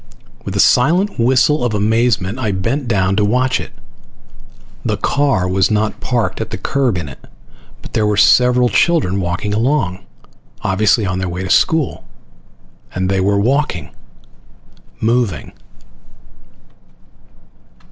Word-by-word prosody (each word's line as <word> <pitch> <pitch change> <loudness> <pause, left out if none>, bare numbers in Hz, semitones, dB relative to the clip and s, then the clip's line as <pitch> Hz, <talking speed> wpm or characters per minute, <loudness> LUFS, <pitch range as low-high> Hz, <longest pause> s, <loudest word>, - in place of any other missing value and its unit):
With - - -6
a - - -1
silent 175 +10 +3
whistle 130 +5 +2
of 120 -3 -1
amazement 110 0 0
I 110 -5 -1
bent 115 +9 -2
down 95 -3 +1
to 105 - +2
watch 125 +5 +1
it. - - -8 1.1
The - - -1
car 140 -11 0
was 95 +1 +1
not 105 0 -1
parked 120 -3 -2
at - - -4
the - - -5
curb 130 -8 -1
in 85 -4 -4
it, 70 - -12 0.6
but - - -11
there 105 -1 +1
were 105 -1 0
several 125 +4 +4
children 105 - +1
walking 90 +4 -3
along, 110 -5 0 0.6
obviously 105 +3 +2
on 90 0 -2
their 95 -1 -3
way 90 +2 -5
to 95 - -3
school. 160 -5 +1 0.9
And 95 +1 -1
they 95 -1 +1
were 100 +1 +1
walking. 120 - -1 1.1
Moving. 110 - -1
110 Hz, 135 wpm, -16 LUFS, 95-125 Hz, 1.1 s, several